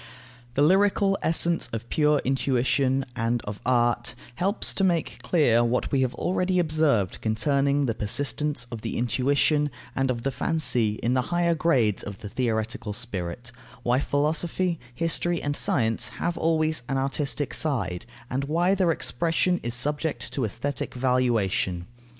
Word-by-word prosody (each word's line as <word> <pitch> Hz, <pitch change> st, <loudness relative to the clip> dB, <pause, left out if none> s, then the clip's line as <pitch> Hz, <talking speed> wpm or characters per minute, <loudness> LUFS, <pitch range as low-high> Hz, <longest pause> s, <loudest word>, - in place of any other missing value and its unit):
The 145 Hz, -, +3 dB
lyrical 195 Hz, +3 st, +3 dB
essence 165 Hz, -3 st, +3 dB
of 115 Hz, +1 st, -5 dB
pure 150 Hz, -2 st, +3 dB
intuition, 130 Hz, 0 st, +1 dB
and 115 Hz, 0 st, 0 dB
of 105 Hz, 0 st, -7 dB
art, 120 Hz, -1 st, +1 dB, 0.2 s
helps 195 Hz, -, +1 dB
to 195 Hz, -, 0 dB
make 175 Hz, -4 st, 0 dB
clear 120 Hz, -9 st, +3 dB
what 120 Hz, +1 st, 0 dB
we 135 Hz, -, +2 dB
have 130 Hz, -1 st, 0 dB
already 185 Hz, 0 st, 0 dB
observed 155 Hz, -, +1 dB
concerning 140 Hz, +5 st, +1 dB
the 115 Hz, -, 0 dB
persistence 140 Hz, +5 st, -1 dB
of 115 Hz, -2 st, -6 dB
the 115 Hz, -, -4 dB
intuition 140 Hz, +5 st, +2 dB, 0.3 s
and 135 Hz, 0 st, 0 dB
of 120 Hz, -2 st, -2 dB
the 135 Hz, -, 0 dB
fancy 125 Hz, -8 st, +1 dB
in 120 Hz, -, +1 dB
the 130 Hz, -, +2 dB
higher 175 Hz, -1 st, +2 dB
grades 135 Hz, -, +1 dB
of 100 Hz, -1 st, -7 dB
the 105 Hz, -, -7 dB
theoretical 110 Hz, 0 st, -2 dB
spirit, 110 Hz, 0 st, -5 dB, 0.3 s
why 125 Hz, +2 st, +2 dB
philosophy, 160 Hz, +4 st, 0 dB, 0.2 s
history, 165 Hz, +2 st, +1 dB
and 145 Hz, 0 st, -2 dB
science 115 Hz, -4 st, +1 dB
have 170 Hz, +9 st, -3 dB
always 160 Hz, -3 st, +1 dB
an 135 Hz, -, 0 dB
artistic 140 Hz, +1 st, -1 dB
side, 100 Hz, -, -1 dB, 0.2 s
and 135 Hz, +3 st, -2 dB
why 170 Hz, +6 st, +2 dB
their 185 Hz, -3 st, +2 dB
expression 165 Hz, +3 st, 0 dB
is 120 Hz, 0 st, -3 dB
subject 150 Hz, +4 st, -2 dB
to 135 Hz, -, -1 dB
aesthetic 125 Hz, +7 st, -4 dB
valuation. 120 Hz, -8 st, 0 dB
135 Hz, 150 wpm, -25 LUFS, 120-160 Hz, 0.3 s, The